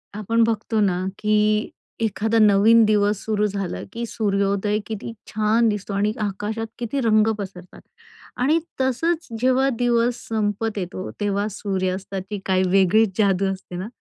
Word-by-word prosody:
आपण 230 Hz, +2 st, +1 dB
बघतो 225 Hz, 0 st, 0 dB
ना 185 Hz, -2 st, +1 dB
की 215 Hz, 0 st, +2 dB, 0.3 s
एखादा 220 Hz, +1 st, +1 dB
नवीन 215 Hz, +2 st, +6 dB
दिवस 210 Hz, -1 st, +2 dB
सुरू 210 Hz, -1 st, +1 dB
झाला 195 Hz, -3 st, -3 dB
की 235 Hz, +1 st, -3 dB
सूर्योदय 200 Hz, -1 st, 0 dB
किती 220 Hz, +1 st, -5 dB, 0.2 s
छान 215 Hz, +2 st, +2 dB
दिसतो 205 Hz, -1 st, -4 dB
आणि 205 Hz, +2 st, +1 dB
आकाशात 210 Hz, +2 st, -3 dB
किती 240 Hz, +3 st, -2 dB
रंग 215 Hz, -2 st, +3 dB
पसरतात 185 Hz, -2 st, -9 dB, 0.6 s
आणि 300 Hz, +6 st, +3 dB, 0.2 s
तसंच 320 Hz, +6 st, 0 dB
जेव्हा 260 Hz, +2 st, +3 dB
दिवस 240 Hz, 0 st, +2 dB
संपत 215 Hz, 0 st, -1 dB
येतो, 185 Hz, 0 st, -4 dB
तेव्हा 205 Hz, 0 st, 0 dB
सूर्यास्ताची 190 Hz, 0 st, -3 dB
काही 185 Hz, -1 st, +2 dB
वेगळीच 195 Hz, +1 st, +3 dB
जादू 195 Hz, -2 st, +2 dB
असते 190 Hz, -1 st, -8 dB
ना? 185 Hz, +3 st, -4 dB
210 Hz, 135 wpm, -22 LUFS, 195-225 Hz, 0.6 s, नवीन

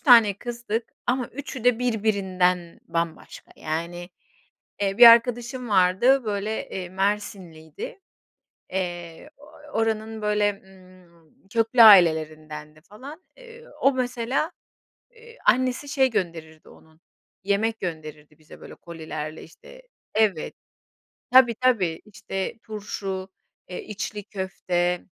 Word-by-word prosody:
tane 230 Hz, -6 st, +6 dB
kızdık 235 Hz, -1 st, -4 dB
ama 250 Hz, -1 st, 0 dB
üçü 260 Hz, -2 st, -8 dB
de 245 Hz, -2 st, +4 dB
birbirinden 190 Hz, -7 st, 0 dB
bambaşka 165 Hz, -1 st, -4 dB
yani, 170 Hz, +3 st, -5 dB, 0.7 s
eee, 195 Hz, 0 st, 0 dB
bir 240 Hz, -, +10 dB
arkadaşım 240 Hz, +1 st, +4 dB
vardı, 200 Hz, +8 st, +4 dB
böyle, 210 Hz, +1 st, -3 dB
eee, 180 Hz, -2 st, -6 dB
Mersinliydi. 190 Hz, -, -4 dB, 0.7 s
Eee, 175 Hz, -, -5 dB
ooo, 290 Hz, +1 st, -17 dB, 0.3 s
oranın 220 Hz, 0 st, -2 dB
böyle, 210 Hz, -1 st, 0 dB
ımm, 185 Hz, -3 st, -21 dB
köklü 230 Hz, +2 st, +2 dB
ailelerindendi 155 Hz, -5 st, +4 dB
falan. 260 Hz, -, -12 dB, 0.2 s
Eee, 475 Hz, -1 st, -14 dB, 0.2 s
o 275 Hz, -, +4 dB
mesela, 250 Hz, +5 st, -1 dB, 0.6 s
eee, 465 Hz, 0 st, -17 dB
annesi 255 Hz, +2 st, +2 dB
şey 265 Hz, -2 st, +2 dB
gönderirdi 165 Hz, -6 st, -4 dB
onun, 160 Hz, +1 st, -20 dB, 0.4 s
yemek 220 Hz, +3 st, 0 dB
gönderirdi 155 Hz, -3 st, -7 dB
bize 155 Hz, -, -15 dB
böyle -, -, -11 dB
kolilerle, 155 Hz, -2 st, -7 dB
işte -, -, -16 dB, 0.3 s
Evet. 210 Hz, -7 st, +1 dB, 0.8 s
Tabii, 250 Hz, -2 st, +6 dB
tabii, 210 Hz, -10 st, +1 dB
işte, 195 Hz, 0 st, -5 dB
turşu, 200 Hz, -3 st, -5 dB, 0.4 s
eee, 180 Hz, -, -6 dB
içli 210 Hz, 0 st, -5 dB
köfte 180 Hz, -3 st, -2 dB
200 Hz, 105 wpm, -24 LUFS, 175-235 Hz, 0.8 s, bir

